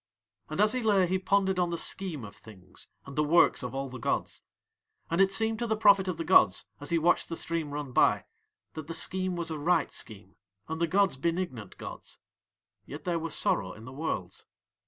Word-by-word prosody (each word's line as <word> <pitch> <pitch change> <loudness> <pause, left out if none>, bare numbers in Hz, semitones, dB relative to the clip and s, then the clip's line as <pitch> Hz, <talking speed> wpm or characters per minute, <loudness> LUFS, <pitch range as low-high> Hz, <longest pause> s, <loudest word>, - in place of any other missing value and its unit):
And 155 - -5
as 210 +1 +5
he 255 - -1
lay 205 -4 +3
he 185 +2 0
pondered 190 -1 +1
on 175 -1 +1
the 170 - -2
Scheme 165 - -1
of 100 - -11
Things 95 -4 -13 0.2
and 140 - -10
the 150 - +2
works 165 +3 +4
of 125 0 -5
all 135 0 -2
the 130 0 -9
gods. - - -2 0.7
And 170 +3 +3
it 195 0 +4
seemed 220 +2 +1
to 240 - -1
the 220 -1 0
prophet 200 -3 +5
of 180 -3 -2
the 165 - -3
gods 95 - +4
as 145 - -7
he 170 - +2
watched 170 +2 +2
the 165 - -3
stream 165 -2 -2
run 145 -2 -5
by - - +3 0.5
that 155 -2 -7
the 165 - -3
Scheme 185 +2 -1
was 170 -1 -4
a 155 - -4
right 170 +5 +1
scheme 100 -3 -7 0.3
and 160 +1 -4
the 170 - +3
gods 190 -3 +2
benignant 165 - -3
gods; - - -9 0.7
yet 145 - -8
there 175 -3 -1
was 165 -1 -4
sorrow 95 -1 0
in 110 - -12
the 130 - -9
Worlds. 130 - -4
165 Hz, 215 wpm, -29 LUFS, 135-190 Hz, 0.7 s, as